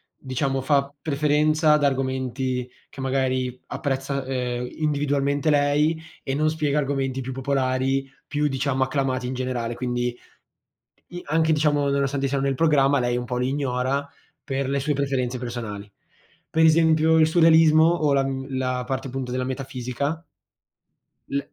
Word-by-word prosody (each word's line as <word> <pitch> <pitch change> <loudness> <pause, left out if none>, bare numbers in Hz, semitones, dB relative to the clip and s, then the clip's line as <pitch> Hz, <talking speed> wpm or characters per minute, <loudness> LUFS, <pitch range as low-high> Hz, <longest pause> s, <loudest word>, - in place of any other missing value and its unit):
diciamo, 135 0 -2
fa 140 0 +1
preferenza 150 +1 +2
ad 150 -1 +2
argomenti 130 -2 -1 0.2
che 135 - -10
magari 130 -1 -1
apprezza, 135 -1 -2
ehm, 125 -2 -2
individualmente 145 -1 0
lei 150 +2 +2 0.2
e 135 - -3
non 155 +2 +2
spiega 150 -2 0
argomenti 135 -2 -1
più 130 - -5
popolari, 135 0 0 0.2
più 150 0 0
diciamo 135 -1 0
acclamati 130 -1 -1
in 125 - -3
generale, 125 -2 -3
quindi 120 0 -2 0.9
i 175 0 -8
anche 160 +2 +2
diciamo 145 -2 +2
nonostante 140 0 0
siano 135 0 -1
nel 140 0 +1
programma 140 -2 +3
lei 120 -1 0
un 125 - -3
po' 125 0 -3
li 125 +1 0
ignora 135 0 -1 0.4
per 135 -1 -2
le 140 0 0
sue 150 +2 0
preferenze 135 -3 -1
personali. 115 -4 -6 0.6
Per 160 0 +2
esempio, 160 0 +4
il 160 - +6
surrealismo 160 -1 +5
o 155 -4 +2
la 135 - +3
mhmm, 135 0 -4
la 130 -1 -1
parte 135 +1 -3
appunto 130 -1 -5
della 125 0 -1
metafisica. 130 +4 -4 1.1
L 140 - 0
135 Hz, 150 wpm, -24 LUFS, 130-145 Hz, 1.1 s, il